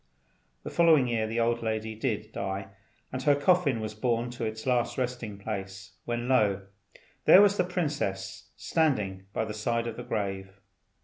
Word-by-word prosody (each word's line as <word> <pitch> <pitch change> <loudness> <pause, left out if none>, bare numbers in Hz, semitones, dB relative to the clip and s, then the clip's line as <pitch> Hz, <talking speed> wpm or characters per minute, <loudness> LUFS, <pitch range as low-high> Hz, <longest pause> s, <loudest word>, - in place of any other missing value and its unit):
The - - -6
following 160 -6 +5
year 115 -2 0
the 115 +2 -2
old 115 0 +1
lady 110 -1 -2
did 110 -2 -3
die, 95 -1 -4 0.4
and 130 - -2
her 145 +2 +4
coffin 145 -4 +3
was 110 -1 -4
borne 120 +2 -1
to 120 -1 -6
its 110 0 -5
last 125 -2 +1
resting 125 -5 -3
place, 95 -2 -6
when 120 0 -2
lo! 105 -7 +2 0.6
there - - +9
was 200 -1 +4
the 180 - +2
princess 145 - -3
standing 105 - 0
by 110 - -1
the 110 - -5
side 115 +2 -1
of 115 -1 -5
the 120 - -5
grave. 95 -2 -4
115 Hz, 170 wpm, -28 LUFS, 105-130 Hz, 0.6 s, there